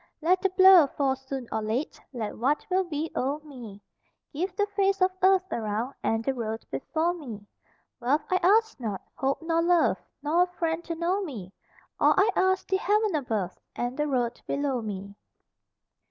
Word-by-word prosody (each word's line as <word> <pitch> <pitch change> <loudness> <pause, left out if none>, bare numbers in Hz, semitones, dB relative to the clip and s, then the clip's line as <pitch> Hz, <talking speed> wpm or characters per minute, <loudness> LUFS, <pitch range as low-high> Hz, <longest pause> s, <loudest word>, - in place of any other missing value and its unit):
Let 360 +4 +2
the 385 - +2
blow 375 -4 +7
fall 270 -1 0
soon 265 -1 -6
or 220 - -1
late, 225 +8 -3
Let 230 -5 -4
what 275 +6 0
will 375 +1 +3
be 320 -2 -4
o'er 275 +3 0
me; 230 -8 -11 0.5
Give 360 +5 -3
the 410 - +2
face 390 -1 +2
of 370 0 +3
earth 380 0 +4
around, 225 +3 -2
And 225 0 0
the 270 - +1
road 225 -3 -4
before 315 - -1
me. 235 - -8 0.5
Wealth 275 +5 +1
I 370 - +4
ask 440 +3 +3
not, 210 -6 -4
hope 275 +4 -1
nor 330 0 +1
love, 345 0 +3 0.2
Nor 315 +4 +2
a 360 - +4
friend 335 -2 -2
to 335 - -3
know 350 +4 0
me; 220 - -7 0.5
All - - +5
I 395 +3 +4
ask, 375 0 +2
the 380 - +2
heaven 420 +1 +1
above 220 - -2 0.2
And 245 +1 -2
the 300 +1 -1
road 245 -4 -1
below 280 -3 -1
me. 200 -2 -6
295 Hz, 180 wpm, -27 LUFS, 240-365 Hz, 0.5 s, blow